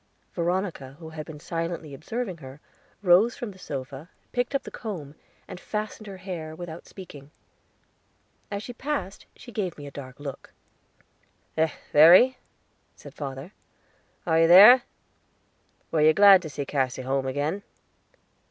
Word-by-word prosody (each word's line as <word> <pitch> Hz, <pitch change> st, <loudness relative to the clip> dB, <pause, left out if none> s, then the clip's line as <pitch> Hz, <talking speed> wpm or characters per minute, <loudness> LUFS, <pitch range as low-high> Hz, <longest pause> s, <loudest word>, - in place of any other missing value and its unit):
Veronica, 175 Hz, -6 st, -2 dB
who 160 Hz, -1 st, -10 dB
had 155 Hz, -1 st, -8 dB
been 155 Hz, -2 st, -9 dB
silently 165 Hz, -2 st, -4 dB
observing 190 Hz, -, -5 dB
her, 135 Hz, -2 st, -12 dB, 0.4 s
rose 195 Hz, +6 st, +4 dB
from 240 Hz, -6 st, -5 dB
the 190 Hz, -, -16 dB
sofa, 140 Hz, +1 st, -7 dB, 0.2 s
picked 245 Hz, +2 st, -1 dB
up 275 Hz, -, 0 dB
the -, -, -9 dB
comb, 170 Hz, -, -7 dB, 0.3 s
and -, -, -9 dB
fastened 215 Hz, +1 st, -5 dB
her 195 Hz, -1 st, -8 dB
hair, 175 Hz, -4 st, -7 dB
without 170 Hz, 0 st, -9 dB
speaking. 150 Hz, -7 st, -12 dB, 1.2 s
As 205 Hz, 0 st, -4 dB
she 245 Hz, -, -7 dB
passed 265 Hz, -6 st, -4 dB
she 240 Hz, -, -13 dB
gave 195 Hz, -6 st, -3 dB
me 145 Hz, -, -9 dB
a 140 Hz, -, -9 dB
dark 135 Hz, -1 st, -10 dB
look. 140 Hz, -2 st, -8 dB, 1.0 s
"Eh, 160 Hz, 0 st, +2 dB, 0.2 s
Verry," 180 Hz, -, +7 dB, 0.6 s
said -, -, -13 dB
father, 140 Hz, +5 st, -7 dB, 0.7 s
"are 160 Hz, -1 st, +2 dB
you 165 Hz, -, +5 dB
there? 210 Hz, +9 st, +9 dB, 1.1 s
Were 160 Hz, -, +1 dB
you 155 Hz, +1 st, +6 dB
glad 200 Hz, -2 st, +8 dB
to 160 Hz, -, -7 dB
see 145 Hz, -1 st, -5 dB
Cassy 130 Hz, -2 st, -2 dB
home 135 Hz, +1 st, -1 dB
again?" 145 Hz, +8 st, -2 dB
165 Hz, 145 wpm, -26 LUFS, 145-200 Hz, 1.2 s, there